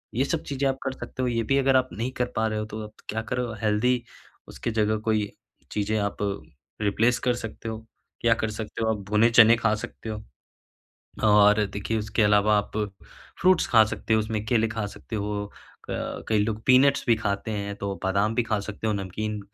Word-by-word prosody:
ये 130 - +2
सब 160 +2 -2
चीजें 140 0 -1
आप 135 - -1
कर 135 - -1
सकते 130 - -7
हो - - +1
ये 115 -1 0
भी 135 +5 +1
अगर 135 -1 +3
आप 130 0 +3
नहीं 120 +4 -3
कर - - +3
पा 110 - +1
रहे 110 -1 -2
हो, 110 - -3
तो 110 0 -7
आप 105 - -9 0.2
क्या 110 +1 -1
करो 125 -1 -1
हेल्दी 115 +3 +2 0.4
उसकी 120 - -4
जगह 110 -1 +1
कोई 105 -2 +1 0.4
चीजें 105 +1 -1
आप 100 0 -2 0.6
रिप्लेस 115 +4 +2
कर 125 - +3
सकते 115 0 -6
हो। 110 - -4 0.4
क्या 115 -1 +5
कर 110 - -2
सकते 110 +1 -5
हो 110 - +1
आप 110 - -1
भुने 105 +2 +4
चने 115 -1 +7
खा 115 -2 +2
सकते 110 - -8
हो, 105 -1 -5 1.0
और 105 0 +6
देखिए 100 +3 -3
उसके 110 +1 0
अलावा 105 0 +4
आप 105 - -4 0.6
फ्रूट्स 185 -1 +4
खा 110 -2 +6
सकते 110 +1 -1
हो 110 - +3
उसमें 110 -1 -3
केले 115 0 +2
खा 110 -2 -3
सकते 110 +2 -7
हो, 105 0 -2 0.4
क - - -4
कई 110 - +3
लोग 110 0 -3
पीनट्स 135 +2 +5
भी 115 -2 +4
खाते 100 0 -2
हैं, 100 -1 -3
तो 100 -1 -3
बादाम 100 +3 +1
भी 120 - +2
खा 110 -2 -1
सकते 105 +2 -6
हो, 110 - +2
नमकीन, 105 +2 -3
110 Hz, 210 wpm, -26 LUFS, 105-115 Hz, 1.0 s, चने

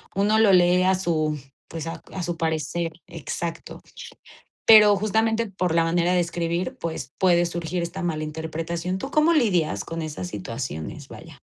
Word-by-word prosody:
Uno 205 +3 +2
lo 220 -3 +5
lee 180 0 +5
a 190 0 +3
su 155 -4 -1 0.3
pues, 165 0 -6
a 165 - -6
a 185 - -4
su 175 -1 -3
parecer, 165 +1 -2 0.2
exacto. 165 0 -6 0.8
Pero 210 -2 +8
justamente 220 +2 +1
por 180 -3 -2
la 165 - +4
manera 170 +2 +1
de 180 - +3
escribir, 170 +7 -2
pues, 160 -6 -5
puede 175 -2 +3
surgir 170 +1 -3
esta 180 +3 -5
mala 155 -3 -2
interpretación. 165 +3 -4
¿Tú 270 +8 -6
cómo 310 +2 +4
lidias 195 - +1
con 165 0 -5
esas 150 - -5
situaciones, 80 -6 -6
vaya? - - -12
175 Hz, 160 wpm, -24 LUFS, 165-190 Hz, 0.8 s, Pero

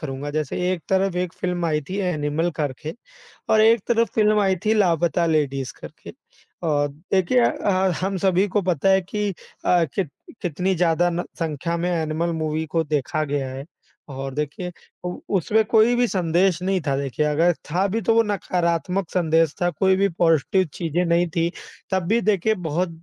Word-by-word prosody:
करूँगा, 145 -1 -5
जैसे 155 -2 -2
एक 175 -3 -4
तरफ़ 190 -1 +1
एक 180 -1 -2
फ़िल्म 180 -1 -1
आई 150 -2 +1
थी 190 - -4
एनिमल 165 -2 0
करके 150 +1 -3 0.6
और 215 - +5
एक 225 -1 +5
तरफ़ 230 -2 +2
फ़िल्म 215 -1 +4
आई 190 -1 +2
थी 220 - +4
लापता 170 -4 +2
लेडीज़ 140 -5 0
करके। - - -11
अ, 145 -4 -4 0.2
देखिए 195 +6 +3
अ, 190 -1 +1
हम 190 0 -1
सभी 190 +1 +2
को 205 +1 0
पता 180 0 +1
है 190 0 +5
कि 205 +3 -2 0.4
अ, 175 -2 +4
कित 185 -7 -1 0.3
कितनी 180 +3 -1
ज़्यादा 175 0 +2
न 175 +1 -2 0.2
संख्या 165 +1 -2
में 175 +1 -1
एनिमल 165 0 -1
मूवी 155 +1 -1
को 165 - +3
देखा 150 +1 -1
गया 140 -2 -2
है। 135 +2 -7 0.4
और 135 0 -5
देखिए 150 +5 -4 0.3
उ - - -1 0.3
उसमें 215 +6 +2
कोई 230 +2 +5
भी 245 0 +3
संदेश 180 -1 +1
नहीं 190 0 +1
था 135 - +2
देखिए 140 +2 -1
अगर 160 +4 +3 0.2
था 180 +5 +1
भी 225 +2 -1
तो 225 - +2
वो 230 - +6
नकारात्मक 180 -2 -1
संदेश 165 -3 +2
था, 175 - +3
कोई 190 +3 +2
भी 200 +1 +3
पॉज़िटिव 165 +1 +2
चीज़ें 170 0 -1
नहीं 170 +1 +2
थी, 165 +1 0 0.4
तब 190 -1 +1
भी 225 +4 +3
देखिए 215 0 +2
बहुत 175 0 -2
175 Hz, 180 wpm, -23 LUFS, 155-190 Hz, 0.6 s, वो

